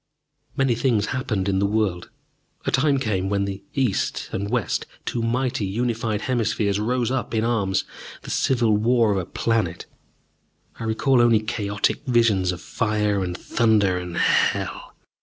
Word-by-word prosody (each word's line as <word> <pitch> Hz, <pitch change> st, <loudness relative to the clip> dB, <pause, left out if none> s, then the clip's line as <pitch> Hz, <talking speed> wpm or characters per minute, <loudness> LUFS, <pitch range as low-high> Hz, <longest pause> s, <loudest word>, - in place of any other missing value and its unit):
Many 135 Hz, -3 st, +3 dB
things 115 Hz, -3 st, +1 dB
happened 115 Hz, -7 st, -1 dB
in 95 Hz, -1 st, +1 dB
the 100 Hz, -, +2 dB
world. 100 Hz, -5 st, -1 dB, 0.6 s
A -, -, 0 dB
time 140 Hz, +1 st, +3 dB
came 95 Hz, -7 st, -1 dB
when 100 Hz, -1 st, 0 dB
the 100 Hz, 0 st, -5 dB
East 130 Hz, -8 st, -1 dB
and 100 Hz, +1 st, -3 dB
West, 115 Hz, -6 st, -1 dB, 0.2 s
two 120 Hz, -, -2 dB
mighty 120 Hz, 0 st, 0 dB
unified 110 Hz, +1 st, -1 dB
hemispheres, 110 Hz, -5 st, 0 dB
rose 120 Hz, +2 st, 0 dB
up 130 Hz, -3 st, -2 dB
in 110 Hz, -, +1 dB
arms: 105 Hz, -5 st, +1 dB, 0.4 s
the -, -, -7 dB
civil 120 Hz, -5 st, +2 dB
war 115 Hz, +1 st, +3 dB
of 100 Hz, -, +1 dB
a 90 Hz, -, -5 dB
planet. 105 Hz, -8 st, -1 dB, 0.9 s
I 115 Hz, -, -4 dB
recall 120 Hz, +3 st, +2 dB
only 115 Hz, -2 st, +5 dB
chaotic 105 Hz, +1 st, -1 dB
visions 110 Hz, -7 st, +3 dB
of 90 Hz, -1 st, -7 dB
fire 105 Hz, -2 st, 0 dB
and 90 Hz, -1 st, -4 dB
thunder 105 Hz, -6 st, +2 dB
and 90 Hz, -1 st, -6 dB
hell. -, -, +1 dB
110 Hz, 155 wpm, -23 LUFS, 100-120 Hz, 0.9 s, only